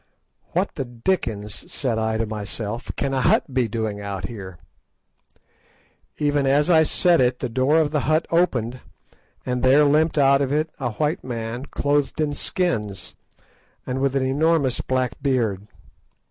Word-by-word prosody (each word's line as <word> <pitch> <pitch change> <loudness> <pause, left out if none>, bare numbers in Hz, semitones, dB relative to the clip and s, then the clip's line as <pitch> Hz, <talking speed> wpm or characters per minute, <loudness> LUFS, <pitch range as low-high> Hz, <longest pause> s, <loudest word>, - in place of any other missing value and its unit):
"What - - 0
the - - -3
dickens," 115 - -3
said 120 -5 -1
I 110 0 0
to 115 - 0
myself, 105 +2 -5
"can 135 - -2
a 130 - +1
hut 130 - +2
be 125 -2 +2
doing 110 -1 -3 0.3
here?" 95 -3 -7 1.6
Even 145 -2 +1
as 145 +5 +3
I 160 -2 +6
said 170 0 +3
it 125 0 +2
the - - -3
door 130 +6 +2
of 155 -3 +2
the 150 - +1
hut 155 +2 +1
opened, 130 -8 +1 0.7
and 125 -1 -1
there 135 +3 +5
limped 155 +2 +2
out 140 -1 +5
of 135 -1 0
it 155 +2 0
a 120 -4 -2
white 150 +6 -1
man 120 +1 -5
clothed 145 0 0
in 150 -2 0
skins, 105 - -2 0.7
and 130 +1 -3
with 140 0 +1
an 135 -1 +1
enormous 140 -1 +1
black 130 0 -2
beard. 115 -8 0
130 Hz, 155 wpm, -23 LUFS, 115-145 Hz, 1.6 s, I